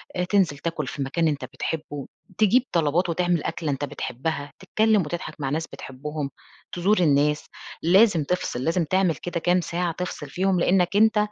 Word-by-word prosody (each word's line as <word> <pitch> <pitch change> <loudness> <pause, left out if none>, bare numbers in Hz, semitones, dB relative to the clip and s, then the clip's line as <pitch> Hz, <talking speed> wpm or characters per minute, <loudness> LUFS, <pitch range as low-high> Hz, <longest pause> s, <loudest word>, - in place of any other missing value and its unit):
آآ 180 - 0
تنزل 180 -6 +2
تاكُل 155 -3 -3
في 145 - -5
مكان 160 +5 0
أنت 145 -2 -1
بتحبّه، 150 -3 -5 0.3
تجيب 225 +4 +4
طلبات 170 +2 +1
وتعمل 175 -1 +1
أكلة 155 -4 -2
أنت 140 +1 -2
بتحبّها، 145 +1 -4
تتكلّم 215 +2 +2
وتضحك 170 +2 -5
مع 135 - -1
ناس 160 +3 -2
بتحبّهم، 140 +1 -6 0.4
تزور 185 +4 +2
الناس. 150 -2 +3 0.4
لازم 185 -2 +5
تفصل، 140 -6 -2
لازم 165 +2 +1
تعمل 185 -1 +2
كده 175 -1 -4
كام 180 +2 +2
ساعة 170 0 -2
تفصل 165 -4 -5
فيهم، 185 +3 +1
لإنّك 180 +1 +2
أنت 220 +1 +5
170 Hz, 165 wpm, -24 LUFS, 145-180 Hz, 0.4 s, لازم